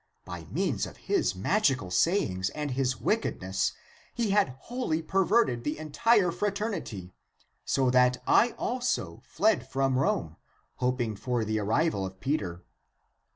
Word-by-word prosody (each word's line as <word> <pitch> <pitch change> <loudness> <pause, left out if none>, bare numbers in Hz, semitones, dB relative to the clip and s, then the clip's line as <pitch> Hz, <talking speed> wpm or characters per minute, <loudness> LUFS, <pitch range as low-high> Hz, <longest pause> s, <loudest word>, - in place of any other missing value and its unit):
By - - -7
means - - -1
of - - -12
his - - 0
magical 130 - +1
sayings 95 - +1
and 150 -2 -3
his 130 0 0
wickedness 100 - 0 0.4
he 230 -4 0
had 195 -11 +2
wholly 245 -10 -2
perverted 190 - +2
the 150 - -2
entire 180 +5 +2
fra 200 +4 -1
ternity, 180 - -4 0.5
so 130 -2 +2
that 125 0 +4
I 235 +1 +4
also 240 - -2
fled 195 - +1
from 135 -1 +1
Rome 80 - 0 0.4
hoping 125 -3 -1
for 120 +2 -1
the 110 +1 -1
arrival 110 +2 +1
of 95 0 -6
Peter. 95 - -2
135 Hz, 135 wpm, -28 LUFS, -, 0.5 s, that